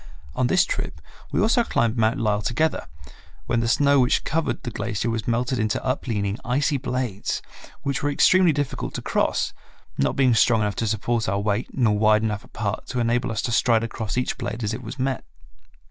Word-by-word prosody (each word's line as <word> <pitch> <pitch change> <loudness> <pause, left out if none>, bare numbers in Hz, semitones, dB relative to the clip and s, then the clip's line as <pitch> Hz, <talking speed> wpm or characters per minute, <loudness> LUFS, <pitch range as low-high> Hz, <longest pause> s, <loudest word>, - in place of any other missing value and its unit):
On 125 - +1
this 185 +7 +4
trip - - -4 0.3
we - - 0
also 230 +2 +3
climbed 115 - 0
Mount 115 +2 +2
Lyell 105 -2 +1
together, 120 +10 0 0.6
when 120 - 0
the 115 - 0
snow 140 +4 +4
which 125 -1 +2
covered 160 +2 -1
the 120 - -4
glacier 115 +1 -2
was 115 -1 -3
melted 120 +2 0
into 110 0 0
upleaning, 110 -6 -1
icy 140 +3 +1
blades 125 -6 -3 0.4
which 140 -2 -1
were 145 - 0
extremely 180 +4 +5
difficult 145 -2 -3
to - - -4
cross, - - 0 0.5
not 70 - +1
being 130 -3 +4
strong 115 0 +4
enough 105 -1 -1
to 115 - 0
support 110 +1 0
our 100 +1 0
weight, 105 +2 -1
nor 110 -5 +2
wide 110 0 +4
enough 105 -2 -2
apart 105 -2 -4
to 125 - -3
enable 120 +1 +1
us 110 - -2
to 120 - -1
stride 115 -1 +3
across 110 -1 -4
each 125 - -1
blade 120 -2 -4
as 105 +1 -1
it - - -5
was 135 - -8
met. 130 -1 -1
115 Hz, 195 wpm, -24 LUFS, 110-130 Hz, 0.6 s, extremely